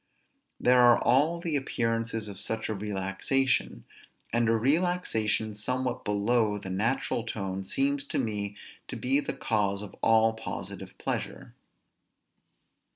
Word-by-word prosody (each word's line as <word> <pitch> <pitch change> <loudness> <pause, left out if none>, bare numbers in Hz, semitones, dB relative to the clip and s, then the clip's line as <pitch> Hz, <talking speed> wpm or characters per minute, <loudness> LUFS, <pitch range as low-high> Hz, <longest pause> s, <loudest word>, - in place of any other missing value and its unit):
There 125 0 +5
are 120 -1 +7
all 155 +7 +3
the 170 -3 -2
appearances 115 -4 -1
of 100 -2 -5
such 110 +3 -3
a - - 0
relaxation; 100 - -1 0.5
and 115 -1 +2
a 115 - +4
relaxation 120 -6 +1
somewhat 125 +4 -2
below 105 +1 +1
the 95 -2 -6
natural 115 +4 0
tone 95 -4 -4
seems 140 +6 0
to - - -2
me 105 -4 -2 0.3
to - - -6
be 135 +3 +2
the - - -3
cause 105 -3 0
of 105 - -10
all 110 0 +4
positive 110 0 -7
pleasure. - - -4
115 Hz, 130 wpm, -28 LUFS, 105-130 Hz, 0.5 s, are